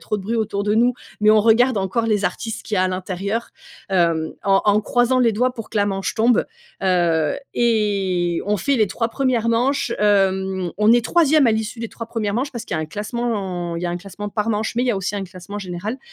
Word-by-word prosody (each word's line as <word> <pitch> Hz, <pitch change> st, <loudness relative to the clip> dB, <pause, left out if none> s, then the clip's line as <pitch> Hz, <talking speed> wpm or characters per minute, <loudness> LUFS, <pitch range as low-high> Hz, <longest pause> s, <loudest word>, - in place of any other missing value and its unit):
trop 210 Hz, -, -2 dB
de 195 Hz, -, -7 dB
bruit 230 Hz, +4 st, -2 dB
autour 205 Hz, -2 st, -1 dB
de 210 Hz, +1 st, +1 dB
nous 245 Hz, +2 st, +3 dB, 0.3 s
mais 210 Hz, 0 st, +5 dB
on 215 Hz, 0 st, +6 dB
regarde 230 Hz, +3 st, +4 dB
encore 195 Hz, +4 st, -1 dB
les 210 Hz, -2 st, +1 dB
artistes 225 Hz, 0 st, -3 dB
qu'il 215 Hz, -, -2 dB
y -, -, +1 dB
a, -, -, +3 dB
à 185 Hz, -, +2 dB
l'intérieur, 190 Hz, +4 st, -3 dB, 0.4 s
hem, 170 Hz, -4 st, +1 dB
en 195 Hz, -1 st, +3 dB
en 210 Hz, 0 st, +4 dB
croisant 245 Hz, +3 st, +2 dB
les 240 Hz, -2 st, +4 dB
doigts 250 Hz, +4 st, 0 dB
pour 225 Hz, -3 st, -8 dB
que -, -, -5 dB
la 205 Hz, -1 st, +3 dB
manche 195 Hz, -1 st, -2 dB
tombe, 230 Hz, +1 st, +3 dB, 0.4 s
heu, 170 Hz, -5 st, +2 dB, 0.2 s
et 195 Hz, -7 st, +1 dB
on 210 Hz, 0 st, +1 dB
fait 275 Hz, +9 st, 0 dB
les 215 Hz, -3 st, +3 dB
3 230 Hz, +4 st, -2 dB
1res 240 Hz, -2 st, 0 dB
manches, 250 Hz, +5 st, +1 dB
hem, 190 Hz, -3 st, +1 dB
on 210 Hz, +2 st, +5 dB
est 240 Hz, -1 st, +3 dB
3e 310 Hz, -3 st, +4 dB
à 230 Hz, -, +4 dB
l'issue 220 Hz, +2 st, -3 dB
des 230 Hz, -, -4 dB
3 230 Hz, -, -8 dB
1res 220 Hz, -3 st, -2 dB
manches 265 Hz, +4 st, -1 dB
parce 235 Hz, -3 st, -6 dB
qu'il 185 Hz, -, -4 dB
y -, -, -1 dB
a -, -, -1 dB
un 155 Hz, -, -4 dB
classement, 200 Hz, -4 st, -3 dB
il 170 Hz, -, -5 dB
y 180 Hz, -, -1 dB
a -, -, -2 dB
un 175 Hz, -, -2 dB
classement 200 Hz, +3 st, -7 dB
par 210 Hz, +2 st, -2 dB
manche 215 Hz, +1 st, -1 dB
mais 240 Hz, -, +1 dB
il 255 Hz, -, 0 dB
y -, -, +3 dB
a 220 Hz, -, 0 dB
aussi 195 Hz, +1 st, -3 dB
un 195 Hz, -, -3 dB
classement 185 Hz, +3 st, -9 dB
général. 200 Hz, +6 st, -5 dB
210 Hz, 250 wpm, -21 LUFS, 190-230 Hz, 0.4 s, on